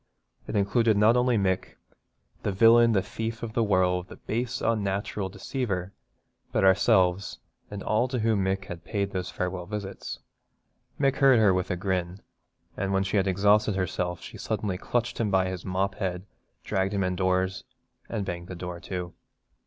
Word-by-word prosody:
It - - -4
included 105 +2 +3
not 110 +3 +5
only 125 -1 +3
Mick, 95 -2 -1 0.7
'the - - -1
villain, 115 +3 +6
the 95 -3 +2
thief 115 +1 -5
of 110 -2 -5
the 115 - +2
world, 90 -3 +2
the - - -10
base 120 +3 -3
unnatural 100 -2 -1
deceiver,' 95 -4 -3 0.6
but - - +1
ourselves, 95 -1 +3 0.3
and 100 -1 -6
all 110 +4 +2
to 130 0 -3
whom 110 -3 +1
Mick 95 0 -1
had 90 -2 -8
paid 100 +2 -2
those 95 -1 -3
farewell 90 -1 -3
visits. 100 -2 -5 0.8
Mick 135 -2 +2
heard 135 -3 +6
her 105 -4 +5
with 90 -1 -1
a - - 0
grin, 90 0 -2 0.6
and 95 0 -2
when 95 0 +2
she 95 +2 0
had 95 0 +2
exhausted 100 +2 +3
herself 90 -2 -2
she - - -10
suddenly 95 -4 -2
clutched 120 +2 -1
him 110 -3 +1
by 95 -1 +2
his 95 -1 -5
mop 95 +1 0
head, 90 -1 -3 0.4
dragged 95 +1 -1
him 100 - +1
indoors, 95 +1 0 0.5
and 105 -4 -2
banged 85 -1 -5
the 90 - -7
door 90 0 -6
to. 90 -1 -5
95 Hz, 170 wpm, -27 LUFS, 90-110 Hz, 0.8 s, villain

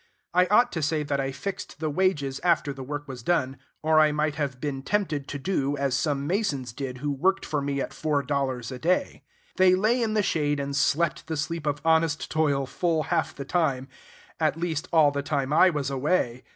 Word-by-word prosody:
I 180 +1 +4
ought 240 +5 +4
to 160 - -3
say 150 +1 0
that 145 -1 -1
I 135 0 -1
fixed 150 +2 -6
the 155 -1 -1
wages 145 -6 0
after 155 -4 +2
the 135 - -9
work 145 +2 -5
was 130 -3 -7
done, 135 -2 0 0.3
or 155 0 +4
I 155 -1 +5
might 150 0 0
have 140 -3 -3
been 135 -1 -3
tempted 150 -4 -1
to 145 - -4
do 145 -3 -1
as 140 -2 0
some 140 0 0
masons 145 - -1
did 130 -1 -5
who 145 +3 -2
worked 185 +8 +1
for 150 -2 -1
me 140 0 -2
at - - -4
four 150 -3 0
dollars 135 -5 -2
a 130 - -6
day. 180 +5 0 0.4
They 185 0 +6
lay 220 +6 +2
in 220 -2 0
the 210 - +3
shade 145 -5 0
and 140 0 -3
slept 155 +3 +1
the 160 - -3
sleep 155 +1 -3
of 145 0 -1
honest 160 -1 +2
toil 145 -3 +1
full 160 +4 0
half - - 0
the 140 - -6
time, 140 -5 0 0.5
at 155 0 +1
least 165 0 -2
all 155 -4 +5
the 140 0 -2
time 140 -1 -1
I 185 +4 +6
was 145 -5 -2
away. 130 -3 0
150 Hz, 215 wpm, -26 LUFS, 140-165 Hz, 0.5 s, They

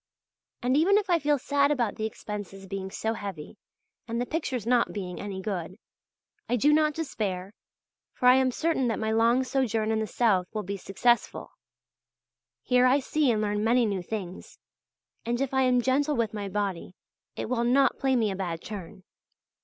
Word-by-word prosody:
And 250 +2 +2
even 360 +7 +4
if 410 -3 0
I 340 - +4
feel 295 -1 +2
sad 280 +1 +2
about 240 -8 0
the 220 - -2
expenses 205 -3 -7
being 190 0 -5
so 220 +2 -2
heavy 195 -9 -7 0.5
and 230 0 -2
the 245 - 0
pictures 260 -6 -3
not 240 0 +2
being 185 -3 -5
any 195 -2 -5
good, 185 -2 -4 0.7
I 245 - +2
do 290 +6 +4
not 305 -1 +3
despair, 200 - -3 0.6
for - - -3
I 250 - +9
am 260 0 +3
certain 290 -1 0
that 225 - 0
my 220 0 -1
long 230 +3 +3
sojourn 240 -4 0
in 220 - +1
the 220 - -2
south 200 -7 +2
will 215 - -2
be 200 +1 -4
successful. 235 +6 0 1.1
Here 250 0 +4
I 265 +3 +4
see 290 +1 +1
and 215 -2 +1
learn 210 0 -1
many 235 +2 +3
new 200 -3 -1
things, 185 -1 -7 0.7
and 240 +1 -1
if 275 -1 -2
I 265 - +3
am 250 -1 +3
gentle 285 +4 +1
with 225 -3 -1
my 205 -2 -4
body, 195 -3 -3 0.4
it - - -4
will 235 0 0
not 265 +3 +3
play 265 -1 +2
me 220 -4 +1
a - - -3
bad 175 -4 -3
turn. 195 -2 -8
230 Hz, 185 wpm, -27 LUFS, 200-260 Hz, 1.1 s, I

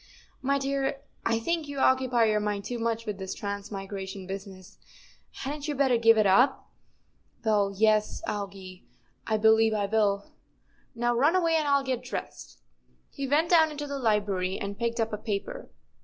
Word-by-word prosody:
" - - -36
My 280 - +3
dear, 275 0 -1 0.2
I 230 0 +1
think 330 +5 -1
you 285 -1 -6
occupy 260 -3 +3
your 215 -1 +2
mind 205 -1 -2
too 245 -1 -4
much 230 0 -1
with 210 -3 -4
this 190 -1 -5
transmigration 200 -1 -6
business. 190 -1 -9 0.6
Hadn't 290 +2 -4
you 295 - -2
better 265 -3 +3
give 225 -1 +5
it 215 - +4
up?" 245 +8 +3 0.3
" - - -36
Well, 205 -2 +2
yes, 215 0 +2
Algy, 195 -3 -6 0.4
I 220 - +1
believe 220 0 +4
I 205 -1 0
will. 200 -1 +1 0.7
Now, 240 +1 +1
run 290 +9 +3
away, 335 -3 +2
and 310 -2 +1
I'll 280 -1 +3
get 255 -2 -2
dressed." - - -7 0.5
He 275 -1 -4
went 310 +5 +2
down 320 -2 +6
into 295 -1 -5
the 280 -1 -4
library 205 -5 0
and 200 0 -5
picked 235 0 -1
up 225 -1 -1
a - - -1
paper. 220 - -4
225 Hz, 175 wpm, -27 LUFS, 200-270 Hz, 0.7 s, down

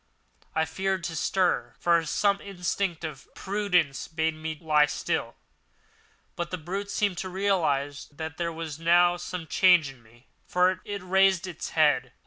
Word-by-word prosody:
I 160 - +2
feared 190 +2 -2
to 165 - -4
stir, 185 +3 0
for 170 -1 +3
some 200 +6 +1
instinct 180 -2 -3
of 150 -4 -7
prudence 180 -9 0
bade 160 0 -1
me 155 0 -5
lie 150 -2 +4
still; 150 - -2 1.0
but 175 0 -3
the 180 - -3
brute 190 +5 -5
seemed 200 -3 0
to 185 - -4
realise 160 -8 0
that 160 +2 -8
there 170 -1 -1
was 160 -2 -6
now 175 +1 +4
some 175 -1 -6
change 175 -3 +4
in 130 -3 -18
me, 120 +3 -22 0.2
for 180 +1 +2
it 200 -2 -5
raised 190 0 +3
its 175 -3 -6
head. 135 -5 +3
170 Hz, 155 wpm, -27 LUFS, 155-185 Hz, 1.0 s, lie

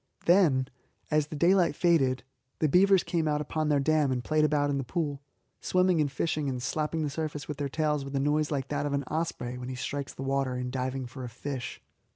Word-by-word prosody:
Then, 165 -8 +4 0.4
as 150 -1 +2
the 155 - -7
daylight 175 +1 +3
faded, 140 -8 +2 0.3
the 155 - +2
beavers 190 +4 +5
came 165 -3 0
out 150 -1 +1
upon 155 +1 -1
their 145 -1 +3
dam 150 -1 +2
and 125 -1 -1
played 155 +2 +2
about 145 -1 +2
in 140 - 0
the - - -2
pool, 145 0 -2 0.4
swimming 180 -3 +2
and 145 - +1
diving 150 +1 -1
and 130 -1 -3
slapping 155 +5 -1
the 150 - -1
surface 150 -1 -4
with 150 - -5
their 140 -1 -2
tails 150 -1 0
with 135 0 -6
a - - +2
noise 150 +2 +1
like 135 -3 -2
that 145 0 -1
of 145 - -2
an 140 0 0
osprey 140 -5 -3
when 125 0 -6
he 130 - -4
strikes 140 +3 -4
the 135 - -6
water 135 -1 0
in 125 0 -3
diving 130 0 -2
for 130 +2 -8
a 125 - -5
fish. 125 +2 -6
145 Hz, 225 wpm, -29 LUFS, 135-155 Hz, 0.4 s, beavers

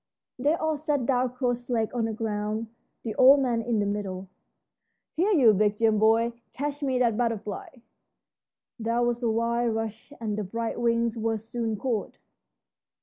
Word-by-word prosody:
They 290 +5 +2
all 315 -2 -1
sat 290 -3 -1
down 250 -1 +1
cross 245 -1 -2
legged 225 -2 0
on 235 -2 0
the 225 - -2
ground, 215 0 -3 0.3
the 225 - -3
old 270 +2 +8
man 245 -4 +1
in 230 0 -1
the 205 - +1
middle. 195 -2 -4 0.9
"Here, 360 +6 +2
you 260 - +6
big 210 +1 +2
Jim 220 -1 +3
boy, 225 +2 +3 0.2
catch 290 +1 -4
me 265 -3 0
that 235 -3 +2
butterfly." 225 -4 -2 1.1
There 230 +2 0
was 240 0 0
a 235 - +1
wild 230 +1 0
rush, 225 +3 -5
and 215 -2 -2
the - - -1
bright 230 +4 -3
wings 235 0 +1
were 225 0 0
soon 225 +1 -3
caught. 230 -1 -3
230 Hz, 165 wpm, -27 LUFS, 220-245 Hz, 1.1 s, old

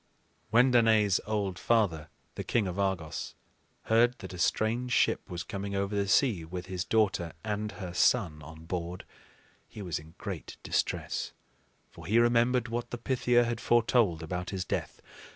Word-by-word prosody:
When 125 +4 +5
Danaë's 110 -5 +4
old 100 -4 -1
father, 90 -10 +1 0.2
the - - -5
king 115 -4 +1
of 90 +2 -4
Argos, 95 -6 -2 0.5
heard 120 +2 +3
that - - -9
a 90 - -8
strange 115 +6 0
ship - - +2
was 90 -1 -4
coming 100 0 -5
over 100 +1 -1
the 100 -1 0
sea 105 - +3
with 90 +2 -6
his 90 -1 -3
daughter 95 -4 +1
and 105 0 -3
her 90 -4 -7
son 75 -2 +2
on 80 +2 -11
board, 90 +1 -4 0.6
he 105 - -9
was 85 -5 -2
in 80 +2 -15
great - - -6
distress; - - -2 0.6
for 85 -1 -11
he 110 +4 +3
remembered 120 +1 +3
what 120 +1 -3
the 120 - -4
Pythia 120 0 +2
had 120 -1 -2
foretold 115 -8 +3
about 90 +2 -4
his 95 -2 -3
death. - - -4
100 Hz, 165 wpm, -29 LUFS, 90-115 Hz, 0.6 s, When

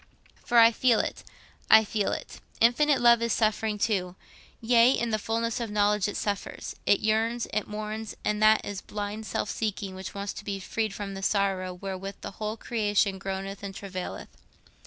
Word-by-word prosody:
For 240 - +1
I 230 0 +8
feel 235 0 +3
it, - - -3 0.5
I 220 0 +8
feel 205 -1 -1
it—infinite 270 +5 +1
love 235 -1 +6
is 235 -1 +1
suffering 215 -1 +1
too—yea, 225 +4 +1
in 235 -1 -1
the 215 - +1
fulness 230 +2 -1
of 235 -2 -3
knowledge 210 -1 +2
it 205 - -4
suffers, 205 -1 -4
it 200 - +4
yearns, 225 +2 +1
it 215 - -1
mourns; 215 +1 -5
and 210 0 0
that 215 0 +5
is 205 -2 -4
a - - -17
blind 210 +1 -5
self 200 - -2
seeking 205 -3 -3
which 190 +1 -8
wants 200 0 -4
to - - -9
be 200 -1 -4
freed 215 +2 -2
from 200 -1 -5
the 195 - -6
sorrow 195 -2 0
wherewith 190 +1 -6
the - - -6
whole 215 +1 -2
creation 205 -4 0
groaneth 195 +1 -5
and 195 -1 -7
travaileth. 185 -3 -6
210 Hz, 180 wpm, -27 LUFS, 195-225 Hz, 0.5 s, I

